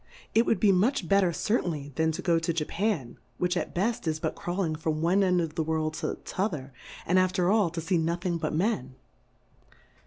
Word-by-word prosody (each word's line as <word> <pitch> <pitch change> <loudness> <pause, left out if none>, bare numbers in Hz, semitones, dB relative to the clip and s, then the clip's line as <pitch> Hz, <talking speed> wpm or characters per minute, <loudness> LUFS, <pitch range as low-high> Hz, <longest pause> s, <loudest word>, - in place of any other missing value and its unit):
It 230 +2 +4
would 215 - +2
be 205 - +5
much 195 +1 +2
better 195 -2 +4
cer 215 +7 0
tainly 145 -4 -5
than 160 +4 +1
to - - -5
go 170 -2 +3
to 165 +1 -1
Jcifan^ 165 - -2 0.2
which 180 0 0
at - - -3
beft, 205 +1 -1
is 155 -1 0
but - - -2
crawling 175 -3 -2
from 155 0 -2
one 175 +5 +3
end 180 -1 +3
of 165 -3 -2
the 165 - -1
World 155 0 -1
to 155 - -2
t'other, 155 -9 -3 0.3
and 185 +2 +3
after 185 0 +2
all 210 -5 +3
to 165 0 -5
fee 165 +2 +1
nothing 170 +1 -1
but - - -2
Men. 155 - -1
170 Hz, 205 wpm, -28 LUFS, 160-190 Hz, 0.3 s, be